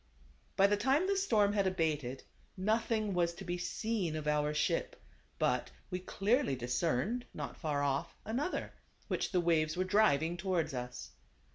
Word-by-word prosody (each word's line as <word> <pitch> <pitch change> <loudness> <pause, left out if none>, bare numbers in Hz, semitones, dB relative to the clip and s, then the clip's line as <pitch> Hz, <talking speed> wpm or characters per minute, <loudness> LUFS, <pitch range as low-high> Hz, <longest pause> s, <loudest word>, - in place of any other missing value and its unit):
By 195 - +5
this 205 +1 +3
time 275 - +3
the 395 +1 +1
storm 215 - +3
had 200 -2 +2
abated. 150 -8 -1 0.3
Nothing 215 +1 +1
was 170 -1 +1
to 195 - -8
be 175 0 -2
seen 195 -3 -2
of 155 -1 -4
our 150 0 +2
ship, 150 - 0 0.4
but - - +1 0.2
we 180 - -1
clearly 205 - +1
dis 125 0 -3
cerned, 170 - +1
not - - -5
far 145 -4 -1
off, 140 -1 -1
another, 260 - -2 0.4
which - - -1
the 185 - +2
waves 160 -1 +2
were 185 - +2
driving 175 -5 +3
towards 175 -4 0
us. 125 -1 -5
180 Hz, 160 wpm, -33 LUFS, 155-215 Hz, 0.4 s, By